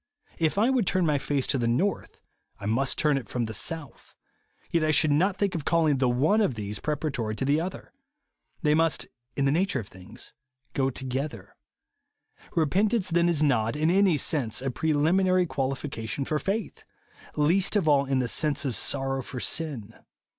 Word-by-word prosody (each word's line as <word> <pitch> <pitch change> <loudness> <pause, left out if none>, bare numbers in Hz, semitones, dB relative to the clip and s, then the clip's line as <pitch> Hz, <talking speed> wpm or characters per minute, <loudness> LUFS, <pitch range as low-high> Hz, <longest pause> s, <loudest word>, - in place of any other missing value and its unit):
If 160 +2 +1
I 225 +6 +3
v/ould 245 -8 +1
turn 185 -2 +2
my 150 -3 +2
face 140 -1 -1
to 135 - 0
the 120 - 0
north, 175 +12 -1 0.4
I - - -13
m.ust 115 +6 0
turn 150 -2 +2
it 130 - -13
from 120 -2 -1
the 110 - -6
south; 145 +5 -3 0.6
yet 165 -2 +2
I 155 - +1
should 155 0 +4
not 185 +7 +2
think 200 -1 0
of 165 - -3
calling 155 -4 +2
the 130 -2 +2
one 150 - +2
of 170 - +1
these 105 -1 -5
pre 150 - -1
paratory 125 -8 -3
to 135 - -2
the 145 +3 +2
other. 185 +6 -7 0.7
They 150 -1 +3
must, 165 +1 +2 0.3
in 140 - 0
the 135 - +3
nature 175 -2 +1
of 105 - -7
things, 90 -1 -12 0.4
go 135 -1 +1
together. 130 -4 -5 1.0
Repentance 190 +5 +1
then 170 +1 +3
is 155 -3 +2
not, 115 -6 +1
in 155 +3 +1
any 190 -4 +4
sense, 130 -5 0
a 135 0 -2
preliminary 175 +6 +2
qualification 135 -3 -3
for 155 +2 -1
faith, 205 +6 -3 0.3
— - - -22
least 175 +8 +2
of 195 -6 +1
all 140 -2 +4
in 135 -1 0
the 125 -1 0
sense 150 +3 0
of 130 -4 -1
sorrow 135 -1 -1
for 125 0 -7
sin. 125 -8 -2
150 Hz, 190 wpm, -26 LUFS, 130-170 Hz, 1.0 s, should